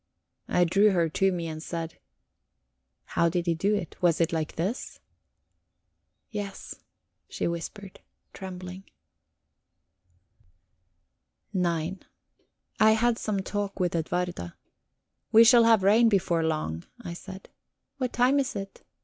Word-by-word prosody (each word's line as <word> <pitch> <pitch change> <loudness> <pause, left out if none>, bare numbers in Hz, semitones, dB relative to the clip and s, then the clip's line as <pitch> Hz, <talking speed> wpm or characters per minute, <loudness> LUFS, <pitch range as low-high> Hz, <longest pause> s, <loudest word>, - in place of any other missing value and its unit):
I 180 - +3
drew 200 +5 +4
her 170 -3 +2
to 195 +4 +2
me 170 -2 -3
and 155 -1 -6
said: 165 0 -5 1.1
"How 170 - +3
did 175 0 -1
he 170 - +2
do 200 +6 +1
it? 180 -6 -6
Was 175 -3 +3
it 170 0 +1
like 160 -1 -2
this?" 195 +10 -3 1.3
"Yes," 205 -2 -6 0.5
she - - -2
whispered, 185 +3 -6 0.3
trembling. 185 0 -8 2.7
IX 175 0 -1 0.8
I 215 0 +6
had 235 +1 +2
some 205 -3 -1
talk 200 +1 -4
with 180 -2 0
Edwarda. 170 - -2 0.8
"We 225 +1 +8
shall 235 0 +7
have 225 -4 +5
rain 225 +4 +5
before 180 -5 +1
long," 155 - -2 0.2
I 175 -3 -5
said. 190 +2 -10 0.5
"What 255 -2 -1
time 255 +3 +3
is 275 -1 -2
it?" 195 -1 -7
185 Hz, 125 wpm, -27 LUFS, 170-210 Hz, 2.7 s, We